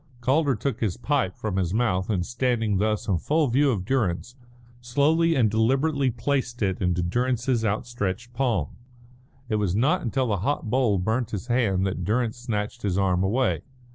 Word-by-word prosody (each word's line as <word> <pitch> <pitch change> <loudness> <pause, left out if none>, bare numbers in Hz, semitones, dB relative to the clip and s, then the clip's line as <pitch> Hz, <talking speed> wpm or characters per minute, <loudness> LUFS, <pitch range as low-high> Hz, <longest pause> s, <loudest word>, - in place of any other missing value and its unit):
Calder 135 +3 +2
took 120 +2 -3
his 105 -6 -1
pipe 125 -6 -1
from 105 -4 -3
his 90 0 0
mouth, 105 -6 0
and, 90 -5 0
standing 120 -4 0
thus 105 +1 0
in 95 -5 +1
full 155 - +1
view 140 +4 +3
of 100 -8 -1
Durrance, 120 -1 -1 0.4
slowly 150 +7 +2
and 120 -5 +4
deliberately 135 +5 +2
placed 125 -1 -2
it 95 -2 -1
into 90 -1 +1
Durrance's 120 +4 0
outstretched 110 +1 -2
palm. 115 - -1 0.7
It 110 - 0
was 100 -3 0
not 145 - +2
until 130 +2 0
the 105 -4 0
hot 110 +2 -2
bowl 125 -6 +2
burnt 110 +5 -1
his 100 0 -5
hand 105 -6 +2
that 95 - -2
Durrance 115 +2 0
snatched 115 -1 -3
his 95 -3 -1
arm 95 -2 +2
away. 120 +7 +1
115 Hz, 170 wpm, -25 LUFS, 100-130 Hz, 0.7 s, and